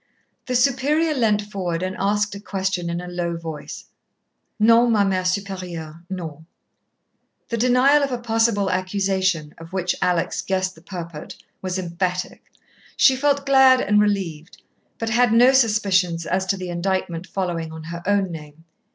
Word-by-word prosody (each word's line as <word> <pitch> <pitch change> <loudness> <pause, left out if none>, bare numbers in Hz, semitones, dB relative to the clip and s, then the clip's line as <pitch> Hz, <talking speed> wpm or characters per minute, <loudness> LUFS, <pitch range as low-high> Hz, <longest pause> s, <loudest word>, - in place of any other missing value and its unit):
The 250 - -1
Superior 280 +5 +2
leant 215 -6 +1
forward 185 -4 -3
and 185 0 -3
asked 205 +1 0
a 200 - -7
question 190 -3 -2
in 170 0 -2
a 180 - -8
low 175 -1 -3
voice. 160 -2 -8 0.7
"Non, 230 +2 +5
ma 210 -3 +3
Mère 190 -1 +1
Supérieure, 180 -5 -4
non." 160 -4 -7 1.0
The 235 - -2
denial 255 +5 +4
of 280 -1 -1
a 250 - -1
possible 225 -4 +1
accusation, 185 -4 -1
of 165 +2 -12
which 180 -2 0
Alex 180 -2 0
guessed 185 -1 -1
the 160 - -18
purport, 170 -4 -8 0.3
was 185 0 -3
emphatic. 180 0 -3 0.5
She 265 - +6
felt 280 +1 +1
glad 265 -2 +6
and 210 -3 +3
relieved, 185 -6 -2 0.3
but 225 -1 -3
had 240 0 +3
no 240 +3 +6
suspicions 195 -8 +2
as 190 +1 -1
to 195 - 0
the 185 -1 -6
indictment 175 -1 -2
following 170 -4 -3
on 160 0 -9
her 170 +2 -7
own 200 -2 +1
name. 155 -1 -10
190 Hz, 155 wpm, -22 LUFS, 170-225 Hz, 1.0 s, She